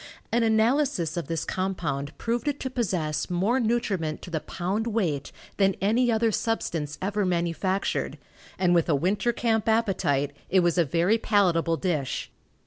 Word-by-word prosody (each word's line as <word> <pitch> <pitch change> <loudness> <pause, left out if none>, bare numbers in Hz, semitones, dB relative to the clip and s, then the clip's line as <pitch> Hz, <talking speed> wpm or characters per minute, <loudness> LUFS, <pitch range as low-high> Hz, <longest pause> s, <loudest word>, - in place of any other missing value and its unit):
An 235 - +2
analysis 225 - +2
of 170 - -3
this 165 -2 -2
compound 170 -7 -3
proved 235 +3 -2
it 290 -1 -1
to 260 - -3
possess 180 -12 -1
more 195 +9 +1
nutriment 205 -10 -1
to 180 - -8
the 160 - 0
pound 190 +8 -3
weight 180 -11 -1 0.3
than 195 -2 +3
any 235 +5 +2
other 225 0 +2
substance 165 -10 -2
ever 205 +2 0
manufactured, 180 +2 -1 0.4
and 180 -2 +3
with 170 -1 +2
a 150 - +4
winter 195 - +1
camp 225 -1 0
appetite, 185 -11 +1 0.2
it 190 0 +4
was 175 0 +2
a 170 - +4
very 175 +10 +2
palatable 175 -7 +2
dish. 155 -9 -2
190 Hz, 155 wpm, -26 LUFS, 165-225 Hz, 0.4 s, a